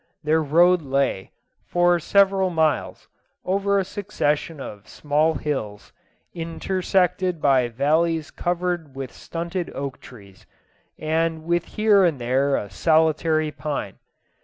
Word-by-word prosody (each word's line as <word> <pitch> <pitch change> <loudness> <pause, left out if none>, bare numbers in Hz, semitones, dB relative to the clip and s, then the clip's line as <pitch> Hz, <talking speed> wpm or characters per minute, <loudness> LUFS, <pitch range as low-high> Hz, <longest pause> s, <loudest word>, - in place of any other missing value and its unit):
Their 155 +1 +2
road 170 +4 +4
lay, 135 -8 -1 0.4
for 175 0 +3
several 195 +2 +3
miles, 160 -3 -1 0.4
over 200 +1 +1
a 195 - +1
succession 165 -7 -2
of 105 -5 -9
small 150 +5 0
hills, 110 -9 -4 0.4
intersected 180 +1 -1
by 135 -4 +3
valleys 155 +6 0
covered 175 -4 -2
with 135 -2 -6
stunted 170 +1 -5
oak 140 -1 -5
trees, 100 -6 -15 0.5
and 160 +1 -1
with 170 0 0
here 210 -2 +5
and 165 -5 +2
there 135 +3 +1
a 100 - -4
solitary 155 - +2
pine. 145 -11 -5
160 Hz, 115 wpm, -23 LUFS, 140-175 Hz, 0.5 s, here